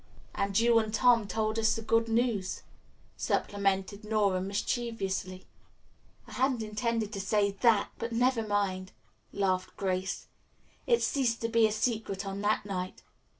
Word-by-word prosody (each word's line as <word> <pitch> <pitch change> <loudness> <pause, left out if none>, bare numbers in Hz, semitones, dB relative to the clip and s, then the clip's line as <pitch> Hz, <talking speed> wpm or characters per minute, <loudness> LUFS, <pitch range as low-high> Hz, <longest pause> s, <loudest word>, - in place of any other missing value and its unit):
"And 200 0 -1
you 230 0 +5
and 220 -1 -2
Tom 230 -1 +4
told 215 +2 -1
us 220 - +3
the 225 - -5
good 230 +1 +2
news," 225 -5 0 0.5
supplemented 200 0 -1
Nora 210 -4 +1
mischievously. 195 -2 -3 0.8
"I - - -14
hadn't 255 -3 0
intended 220 0 -2
to 195 - -3
say 200 0 +2
that, 210 +1 +2
but 230 +1 -3
never 245 +1 +2
mind," 200 -3 -1 0.4
laughed 185 -2 -1
Grace. 190 -1 -2 0.6
"It 470 -1 +3
ceased 245 -5 +1
to 230 - -1
be 230 -1 +4
a - - -3
secret 215 -3 -1
on 195 0 -4
that 210 0 +1
night. 185 -2 -5
215 Hz, 145 wpm, -30 LUFS, 195-230 Hz, 0.8 s, you